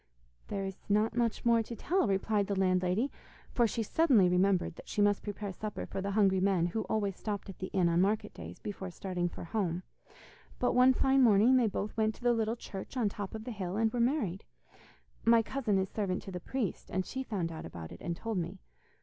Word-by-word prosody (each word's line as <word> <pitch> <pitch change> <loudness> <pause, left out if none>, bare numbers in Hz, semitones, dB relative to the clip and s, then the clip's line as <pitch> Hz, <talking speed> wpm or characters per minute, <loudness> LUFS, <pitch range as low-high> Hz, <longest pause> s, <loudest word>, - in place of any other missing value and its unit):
'There 195 -1 -3
is 195 -1 -6
not 210 +2 +2
much 235 -1 0
more 235 -1 +5
to 230 +1 -6
tell,' 355 - +1
replied 200 +1 +1
the 200 -2 -1
landlady, 185 +6 +2 0.4
for 240 -2 +3
she 225 +1 -2
suddenly 245 - +4
remembered 180 0 +2
that - - -12
she - - -3
must 205 -1 +3
prepare 205 -1 -5
supper 210 +2 -5
for 195 - -4
the 200 - -2
hungry 195 -3 +4
men 185 -3 +2
who 185 +6 -1
always 200 -3 -1
stopped 205 0 -4
at 195 - -9
the 185 - -3
inn 185 -3 +2
on 170 +1 +3
market 210 +3 0
days, 85 +1 -9
before 195 -2 -6
starting 180 -1 -2
for - - -8
home, 175 -1 -2 0.7
'but 245 - +1
one 250 +1 +6
fine 265 +1 +3
morning 230 +1 +6
they 245 -3 +4
both 205 0 -3
went 220 -1 +1
to - - -16
the 240 0 +4
little 225 0 0
church 210 +2 -8
on 225 -5 +2
top 200 +1 -6
of 220 - -6
the 245 - -5
hill, 190 -3 -4
and 225 0 +2
were 245 - -1
married. 235 - 0 0.8
My 230 0 +5
cousin 225 -4 0
is 190 0 +1
servant 190 -2 -2
to 195 - -8
the 180 - -4
priest, 230 +1 -3
and 185 0 -1
she 265 - -4
found 195 -10 -2
out 160 - -6
about 80 -2 -8
it - - -11
and 170 0 -3
told 225 -2 -2
me. 175 +3 -4
205 Hz, 225 wpm, -31 LUFS, 185-230 Hz, 0.8 s, one